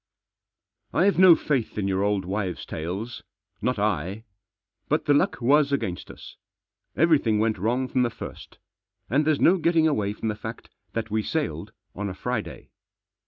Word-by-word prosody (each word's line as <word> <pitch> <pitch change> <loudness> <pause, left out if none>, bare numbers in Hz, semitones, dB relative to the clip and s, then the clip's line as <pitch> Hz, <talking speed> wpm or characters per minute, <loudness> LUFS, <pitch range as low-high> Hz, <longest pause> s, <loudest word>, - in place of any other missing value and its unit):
I'VE 195 +1 +3
no 185 -3 +9
faith 135 -10 -2
in 100 -2 0
your 95 0 0
old 100 -2 0
wives' 95 -2 -3
tales. 95 +9 -5 0.4
Not - - 0
I. 100 +5 -1 0.7
But 150 +1 +1
the 145 - +4
luck 145 - +2
was 140 +3 +3
against 95 -10 -2
us. - - -12 0.6
Everything 150 -10 +3
went 110 -2 +1
wrong 120 +6 0
from 130 - 0
the 120 - +2
first. - - -10 0.5
And 145 +4 +3
there's 155 -2 +2
no 185 +2 +5
getting 165 -1 +3
away 105 -9 0
from 110 +1 -3
the - - 0
fact 115 +2 -8 0.2
that 110 -2 -3
we 110 0 +1
sailed - - -3 0.2
on 100 +1 -4
a 95 - -6
Friday. 125 +1 -4
115 Hz, 165 wpm, -25 LUFS, 105-145 Hz, 0.7 s, no